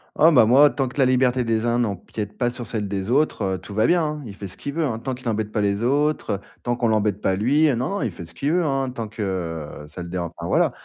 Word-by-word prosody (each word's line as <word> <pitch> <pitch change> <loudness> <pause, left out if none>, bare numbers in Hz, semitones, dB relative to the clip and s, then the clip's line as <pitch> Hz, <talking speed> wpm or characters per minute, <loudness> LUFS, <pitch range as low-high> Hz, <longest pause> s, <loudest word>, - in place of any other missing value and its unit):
Oh, 160 +2 +6
bah, 125 -7 +6
moi, 135 +6 +7
tant 135 -2 -1
que 125 - -10
la 135 - +5
liberté 130 0 +3
des 115 -1 0
uns 120 0 +1
n'empiète 105 -1 -3
pas 120 -2 +1
sur 120 0 -6
celle 105 -2 -3
des 100 +2 -3
autres, 150 +4 +2
heu, 95 -1 0
tout 95 +3 -10
va 110 - +3
bien, 175 -1 +3
hein. 150 -1 -3
Il 105 - -8
fait 100 0 -7
ce 90 - -10
qu'il 140 - -5
veut, 165 +2 0
hein. 120 -6 -2
Tant 130 +3 -3
qu'il 125 -1 -4
embête 110 -1 -2
pas 105 - 0
les 100 +1 0
autres, 145 +4 +1
heu. 100 - -1 0.2
Tant 120 0 0
qu'on 120 -1 0
l'embête 105 -2 +1
pas 95 - +1
lui. 135 +10 +3
Non, 125 +3 -1
non, 200 +1 -2
il 110 - -1
fait 85 0 -9
ce 85 - -14
qu'il 140 - -1
veut, 175 -1 +2
hein. 135 -2 0
Tant 115 -3 -5
que, 110 +1 -8
heu, 80 -6 -4
ça 80 +4 -9
le 85 - -7
déran 90 -1 -2
enfin, - - -6
voilà. - - +3
115 Hz, 300 wpm, -23 LUFS, 100-135 Hz, 0.2 s, moi